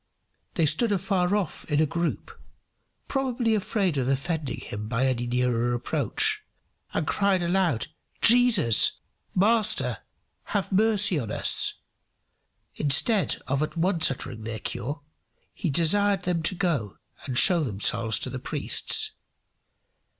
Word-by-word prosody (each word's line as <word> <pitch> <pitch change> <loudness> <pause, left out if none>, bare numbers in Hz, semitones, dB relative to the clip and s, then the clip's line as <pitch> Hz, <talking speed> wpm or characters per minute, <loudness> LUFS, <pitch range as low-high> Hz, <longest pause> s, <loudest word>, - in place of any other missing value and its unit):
They 165 - +2
stood 160 +10 +3
afar 190 -1 0
off 200 -6 -3
in 145 - +2
a 155 - +4
group, 170 +3 -3 0.8
probably 250 -4 -1
afraid 195 -6 0
of 130 - -1
offending 140 +2 -2
him 105 +1 -6
by 120 +3 0
any 120 -2 -1
nearer 120 -1 0
approach, 165 - -1 0.5
and - - -2
cried 195 -3 +1
aloud, 175 - 0 0.3
"Jesus, 230 - +5 0.4
Master, 215 +3 +1 0.5
have 200 -5 -3
mercy 205 -3 +3
on 115 -5 -5
us." - - +1 1.0
Instead 155 - +1
of 140 +1 -1
at 155 +2 -3
once 170 -1 +2
uttering 125 -4 -6
their 110 0 -5
cure, 145 +7 -5 0.5
he 180 - -3
desired 195 +6 +3
them 175 -2 -1
to 160 - 0
go 155 - -2 0.3
and 130 -2 -2
show 175 +1 +4
themselves 110 -1 -1
to - - -3
the - - -5
priests. - - 0
165 Hz, 130 wpm, -25 LUFS, 130-200 Hz, 1.0 s, Jesus